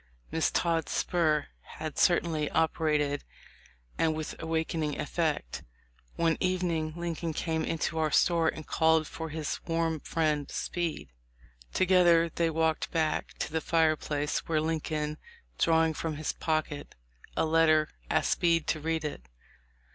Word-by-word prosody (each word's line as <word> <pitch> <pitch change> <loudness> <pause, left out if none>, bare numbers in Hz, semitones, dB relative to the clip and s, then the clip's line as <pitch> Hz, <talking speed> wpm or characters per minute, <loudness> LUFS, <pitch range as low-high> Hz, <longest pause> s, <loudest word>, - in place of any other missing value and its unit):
Miss 160 - +2
Todd's 165 -2 0
spur 155 -4 +1 0.2
had 155 -2 -6
certainly 165 -4 +2
operated 150 -3 +1 0.8
and 160 -1 +2
with 155 -1 -4
awakening 160 -2 -1
effect. 150 - -1 0.5
One 165 -1 +2
evening 175 -4 0
Lincoln 170 -1 -3
came 160 0 -1
into 160 0 -1
our 155 -1 +2
store 165 0 +3
and 155 -1 -2
called 160 -1 +3
for 160 +1 -6
his 155 -1 -3
warm 165 -1 0
friend 150 -2 -1
Speed. 165 - -3 0.6
Together 175 -3 +4
they 170 -1 +1
walked 160 0 0
back 160 -2 -1
to - - -3
the 160 0 -1
fireplace, 155 -3 +1
where 160 -2 +2
Lincoln, 155 -1 -2 0.4
drawing 160 -1 +3
from 155 0 -3
his 155 +1 -2
pocket 155 -3 -2 0.4
a - - +3
letter, 155 -1 +4 0.2
asked - - +2
Speed 165 -2 +2
to 155 - +1
read 160 0 -1
it. 100 - -6
160 Hz, 130 wpm, -29 LUFS, 155-165 Hz, 0.8 s, Together